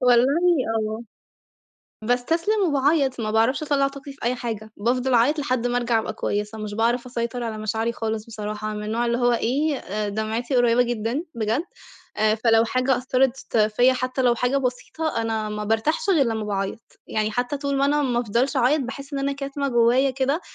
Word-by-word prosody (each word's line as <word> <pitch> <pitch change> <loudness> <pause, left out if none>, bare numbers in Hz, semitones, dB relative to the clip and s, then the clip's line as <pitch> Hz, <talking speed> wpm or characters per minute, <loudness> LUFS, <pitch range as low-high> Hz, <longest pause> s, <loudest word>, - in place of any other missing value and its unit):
والله 270 +6 +4
آه 220 +2 -3 1.0
باستسلم 330 - +1
وباعيط، 275 -2 +2
ما 215 -1 -2
باعرفش 225 +7 +2
أطلع 280 -2 +2
طاقتي 275 0 -10
في 275 - -20
أي 245 +1 +1
حاجة 220 -3 -5
بافضل 250 +4 0
أعيط 270 +7 +3
لحد 255 -4 0
ما 245 0 0
أرجع 235 -2 +1
أبقى 220 0 -3
كويّسة، 210 0 -3
مش 210 -1 -5
باعرف 240 +3 +1
أسيطر 240 0 -3
على 220 -2 -4
مشاعري 220 +2 -1
خالص 220 -1 -3
بصراحة، 215 -1 -5
أنا - - -5
من - - -5
النوع 235 +2 0
اللي 235 +1 0
هو 245 -1 +3
إيه 240 -5 -1
دمعتي 220 +5 -2
قريبة 245 0 +4
جدًا 240 +6 -2
بجد، 225 +6 0 0.5
آآ 215 0 +3
فلو 225 0 +3
حاجة 255 +2 +1
أثّرت 255 -1 0
فيّ 215 +5 +4
حتّى 255 +1 -2
لو 240 -1 +4
حاجة 250 +3 0
بسيطة 255 +1 -2
أنا 220 -1 -2
ما 210 0 -4
بارتاحش 300 - 0
غير 290 -8 +4
لمّا 220 -2 -2
باعيط، 200 +2 -4
يعني 215 0 -1
حتّى 245 +5 -1
طول 280 -1 -1
ما 275 - +2
أنا 295 +1 +2
ما 245 -3 +1
أفضلش 245 +5 0
أعيط 260 +4 +3
باحس 275 +3 -6
إن 275 - -2
أنا 280 +1 0
كاتمة 275 0 -3
جوّايا 245 +3 +3
كده، 270 +5 0
245 Hz, 185 wpm, -23 LUFS, 220-275 Hz, 1.0 s, والله